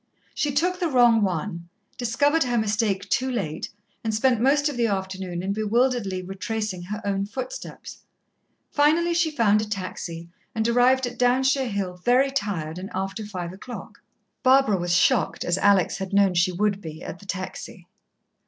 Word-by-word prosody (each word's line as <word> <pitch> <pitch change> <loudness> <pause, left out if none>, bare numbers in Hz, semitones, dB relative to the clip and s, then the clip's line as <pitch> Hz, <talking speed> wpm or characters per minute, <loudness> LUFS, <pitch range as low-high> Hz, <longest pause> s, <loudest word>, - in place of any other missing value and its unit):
She 295 - 0
took 355 +6 0
the 350 - +1
wrong 240 -4 +5
one, 170 -2 -2 0.3
discovered 285 +6 +2
her 245 -1 0
mistake 210 -2 0
too 260 +1 0
late, 180 -11 -3 0.3
and 220 -1 -1
spent 240 0 +2
most 285 +3 +3
of 295 - -3
the 235 -1 +2
afternoon 190 -3 -3
in 195 +1 -1
bewilderedly 215 -3 0
retracing 195 0 -4
her 210 +5 -6
own 200 0 -1
footsteps. 270 - -7 0.7
Finally 320 +4 +3
she 340 -1 +2
found 220 -8 +3
a - - -2
taxi, 175 -4 -5 0.3
and 220 0 +1
arrived 250 +2 +4
at 245 0 -7
Downshire 260 +1 +2
Hill 195 -3 -3
very 255 +3 +3
tired, 180 - -3
and 190 +2 -7
after 195 +3 -3
five 180 -4 -6
o'clock. 240 +6 -9 0.4
Barbara 260 -5 +4
was 175 0 0
shocked, 225 -2 +2
as 175 +2 +1
Alex 195 -3 +3
had 190 0 -5
known 200 -2 +4
she 180 +1 +2
would 200 +2 0
be, 155 -3 -8
at 175 - -7
the 200 - -15
taxi. 190 0 -6
210 Hz, 165 wpm, -24 LUFS, 190-255 Hz, 0.7 s, wrong